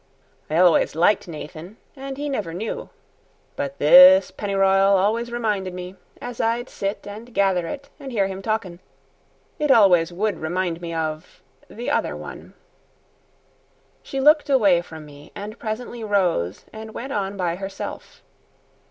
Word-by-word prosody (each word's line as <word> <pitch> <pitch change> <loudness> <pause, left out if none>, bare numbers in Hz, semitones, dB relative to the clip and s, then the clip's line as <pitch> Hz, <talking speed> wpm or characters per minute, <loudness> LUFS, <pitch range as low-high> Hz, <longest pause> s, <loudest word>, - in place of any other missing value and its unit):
I 155 - 0
always 175 -4 +4
liked 180 +5 +2
Nathan, 165 +5 -9 0.2
and 270 0 -7
he 290 +1 -3
never 205 - -3
knew. 220 +5 -5 0.7
But 280 -1 -4
this 275 +2 +8
pennyr'yal 195 -1 +2
always 225 +5 0
reminded 210 -6 -2
me, 180 0 -7 0.3
as 245 -1 -5
I'd 235 +2 -1
sit 200 +1 -4
and 215 +4 -9
gather 190 -3 +2
it 280 +5 -7
and 275 -2 -8
hear 205 -5 +1
him 190 0 -5
talkin' 200 -5 -3 0.8
it 300 -1 0
always 180 -9 +5
would 200 0 -2
remind 175 +1 -2
me 170 -1 -5
of 160 0 -5 0.3
the 235 +3 -5
other - - 0
one." - - -10 1.5
She 270 - -5
looked 300 +2 +4
away 200 -10 +4
from 160 -3 -11
me, 145 0 -15
and 210 +3 -8
presently 230 +1 -5
rose 180 - 0
and 220 0 -9
went 265 +3 -5
on 200 -1 -3
by 175 -2 -1
herself. 195 0 -8
200 Hz, 145 wpm, -22 LUFS, 175-235 Hz, 1.5 s, this